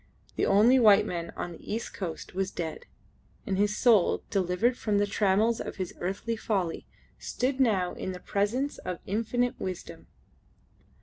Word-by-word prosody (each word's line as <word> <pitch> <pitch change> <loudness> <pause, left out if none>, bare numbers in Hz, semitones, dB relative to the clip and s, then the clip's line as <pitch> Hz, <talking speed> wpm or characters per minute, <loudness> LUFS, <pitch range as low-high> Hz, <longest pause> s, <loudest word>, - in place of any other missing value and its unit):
The - - +1
only 230 +6 +5
white 215 -4 +6
man 170 -1 -4
on 175 - -4
the 170 - -10
east 230 +1 -4
coast 175 -6 -6
was 190 0 -1
dead, 165 -4 -5 0.6
and 195 - -1
his 205 +2 +1
soul, 220 -7 +4
delivered 195 +5 +1
from 210 -4 0
the 205 - +3
trammels 210 +2 +2
of - - -6
his 185 -2 -4
earthly 195 +6 -2
folly, 195 -7 -2 0.3
stood 260 +2 -2
now 200 -8 +2
in 190 - -4
the 180 - -7
presence 220 +10 -1
of 180 - -4
Infinite 230 +4 -1
Wisdom. 185 -2 -6
205 Hz, 160 wpm, -28 LUFS, 185-230 Hz, 0.6 s, white